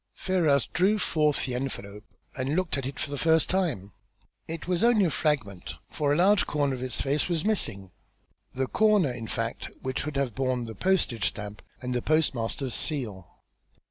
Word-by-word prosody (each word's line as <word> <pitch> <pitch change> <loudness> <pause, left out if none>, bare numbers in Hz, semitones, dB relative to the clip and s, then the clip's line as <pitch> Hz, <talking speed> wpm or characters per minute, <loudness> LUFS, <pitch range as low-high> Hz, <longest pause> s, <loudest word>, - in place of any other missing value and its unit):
Ferrars 160 -8 +2
drew 195 +5 +2
forth 150 -6 +1
the 130 - -3
envelope 105 -5 -5 0.3
and 135 +3 -1
looked 185 -1 +1
at 135 -2 -2
it 135 - -6
for 145 - -3
the 145 - -3
first 160 -1 +3
time. 160 - -1 0.6
It 165 0 -6
was 180 +1 +1
only 230 -4 +5
a 165 - +1
fragment, 135 - -1 0.2
for 145 -2 0
a - - +4
large 190 +4 +4
corner 145 -2 0
of 125 - -5
its 130 -1 -2
face 145 +5 0
was 165 -1 0
missing, 105 - +1 0.6
the 130 +1 -1
corner, 210 -3 +3
in 115 -2 -6
fact, 115 +1 -3
which 130 0 -2
should 150 -1 -3
have 135 -4 0
borne 130 -1 -1
the 110 - -7
postage 130 - +1
stamp 105 -1 -5 0.2
and 125 0 -2
the 125 - 0
postmaster's 135 -4 0
seal. 110 - -2
140 Hz, 180 wpm, -27 LUFS, 120-165 Hz, 0.6 s, only